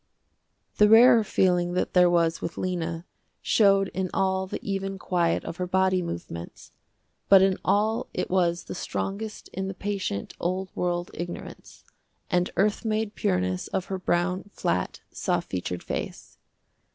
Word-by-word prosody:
The 210 0 +6
rarer 230 +1 +8
feeling 180 -3 +1
that 180 - -1
there 180 -1 +6
was 165 -1 +2
with 165 - -5
Lena, 170 -2 -3 0.3
showed 195 -2 +3
in 185 +1 -3
all 190 0 +1
the - - -5
even 195 0 -2
quiet 175 -3 0
of 165 - -6
her 180 - -2
body 185 0 +2
movements, 85 - -7 0.6
but 195 -1 +8
in 190 -1 +2
all 220 +4 +1
it - - -2
was 175 -2 +1
the - - -7
strongest 210 +4 -4
in 190 0 -4
the 195 - -5
patient, 195 - -3
old 185 +2 -2
world 175 0 -1
ignorance, 175 0 -8 0.5
and 180 -1 +2
earth 205 +3 +2
made 220 -1 -1
pureness 90 0 -1
of 190 - -2
her 190 - -2
brown, 180 +1 0
flat, 90 +1 -1
soft - - -2
featured 90 -1 -3
face. - - -6
185 Hz, 150 wpm, -26 LUFS, 175-195 Hz, 0.6 s, rarer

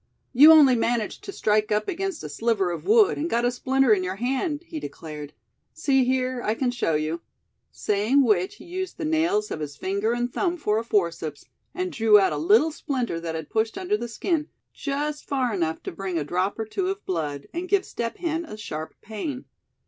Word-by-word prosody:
"You 290 +5 +9
only 290 -5 +7
managed 230 -1 -1
to 395 - -5
strike 215 - +1
up 210 0 +1
against 390 - -3
a - - -4
sliver 195 +3 0
of 170 - -6
wood, 435 0 +5
and 320 +3 -1
got 235 -3 +1
a 245 - +2
splinter 260 -1 +3
in 190 -3 +1
your 185 +1 -3
hand," 270 - -1
he 325 -2 -6
declared; 150 - -8 0.4
"see 270 -5 +2
here, 255 -1 0
I 215 - 0
can 250 0 0
show 235 -10 0
you," 155 +2 -2 0.5
saying 215 +7 +2
which 195 -6 +2
he - - -14
used 370 +1 -5
the 320 - -3
nails 335 +7 +1
of - - -3
his 145 -2 -6
finger 200 +4 -1
and 240 0 -2
thumb 355 -2 0
for 215 -9 +1
a - - -4
forceps, 170 -8 -1 0.3
and 365 0 -2
drew 220 -5 +5
out 190 -5 +2
a - - -2
little 220 - +4
splinter 255 - -3
that 165 -1 -4
had 160 -2 -6
pushed 220 0 0
under 380 +2 0
the 240 - -4
skin, 300 - -1 0.2
just 295 +1 -3
far 255 -4 0
enough 165 -4 -2
to - - -4
bring 185 0 -4
a 155 - 0
drop 180 +6 -1
or 220 - -2
two 365 - -2
of 390 +1 -4
blood, 150 -6 -3
and 355 +2 -4
give 395 -1 +2
Step 230 -1 -4
Hen 330 -1 -2
a 215 - -9
sharp 160 -7 -6
pain. 250 +5 -5
235 Hz, 210 wpm, -25 LUFS, 190-305 Hz, 0.5 s, You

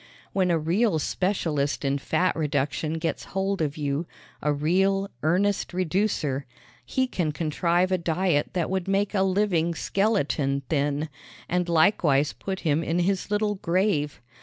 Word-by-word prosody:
When 185 -2 +2
a 170 - +3
real 175 +5 +1
specialist 155 -4 -1
in 140 +1 +1
fat 180 +6 +1
reduction 150 0 -1
gets 165 0 -2
hold 195 -1 0
of 150 -1 -1
you 145 +2 -2 0.3
a 150 - +1
real, 190 +7 +1
earnest 185 +4 +1
reducer 180 -7 0 0.4
he 260 - 0
can 175 -11 -1
contrive 170 +4 +1
a 185 - +2
diet 170 -2 +1
that 175 -1 -1
would 190 -1 -1
make 195 +1 +1
a 195 - +2
living 185 -4 +1
skeleton 150 -10 0
thin 145 0 0 0.4
and 180 0 0
likewise 155 -5 +3
put 190 -1 -5
him 155 -1 +1
in 165 +1 -1
his 185 +3 0
little 210 0 +1
grave. 180 -5 0
170 Hz, 145 wpm, -26 LUFS, 150-195 Hz, 0.4 s, a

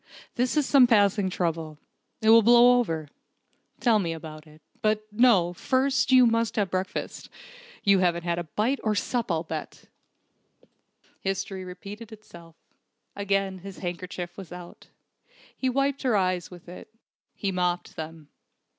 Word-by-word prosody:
"This 250 +5 0
is 295 - +3
some 265 -2 +6
passing 205 -4 +3
trouble. 165 -4 -3 0.5
It 220 - +6
will 230 0 +8
blow 240 +2 +6
over. 160 -10 -2 0.7
Tell 230 -4 +3
me 170 -4 -2
all - - -6
about 155 -1 -10
it. 155 0 -19 0.2
But 215 0 0
no, 210 -6 +4
first 265 +6 +1
you 255 -1 +7
must 230 -1 +1
have 200 -4 0
breakfast. 185 +1 -4 0.5
You 200 -1 +4
haven't 170 -2 +1
had 175 0 -1
bite 245 +6 +1
or 215 -1 +1
sup, 230 0 -1
I'll 165 -1 0
bet!" 160 -2 -7 1.3
History 195 0 -3
repeated 200 +5 -10
itself. 170 -6 -14 0.6
Again 195 -1 -1
his 195 +1 -10
handkerchief 175 -1 -6
was 190 -4 -10
out. 175 -1 -11 0.7
He 260 - -1
wiped 275 +2 0
her 245 -6 +2
eyes 185 -2 -1
with 180 -2 -14
it. 180 +4 -11 0.5
He 200 - -2
mopped 180 -1 -2
them. 160 -1 -8
195 Hz, 145 wpm, -26 LUFS, 175-230 Hz, 1.3 s, will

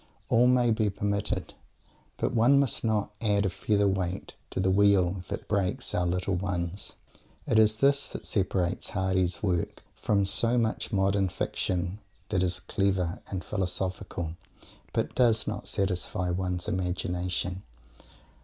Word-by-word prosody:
"All 120 +2 +5
may 125 -2 +4
be 110 -1 +2
permitted," 100 +1 -2 0.6
but - - -1
one 125 +5 +5
must 140 -4 0
not 110 -2 +1
add 105 -2 +2
a 95 - +1
feather's 100 +1 +2
weight 95 0 -3 0.2
to - - -4
the 95 0 +2
wheel 95 -2 +4
that - - -5
breaks 100 -3 -1
our 90 - +1
"little 90 +2 0
ones." 90 0 -2 0.5
It 110 - +3
is 110 0 +4
this 140 +1 +3
that - - -7
separates 95 -2 0
Mr. - - -10
Hardy's 95 -2 0
work 90 -4 -1
from 100 -2 +1
so 115 +5 +2
much 115 -2 0
modern 95 -1 +2
fiction 90 +2 -2 0.3
that 95 -4 +1
is 90 0 0
clever 95 -3 0
and 95 -2 -4
"philosophical" 90 -3 -3 0.6
but - - -1
does 115 -3 +3
not - - -4
satisfy 95 -1 -1
one's 90 +1 -2
imagination. 90 -1 -2
95 Hz, 145 wpm, -28 LUFS, 90-105 Hz, 0.6 s, All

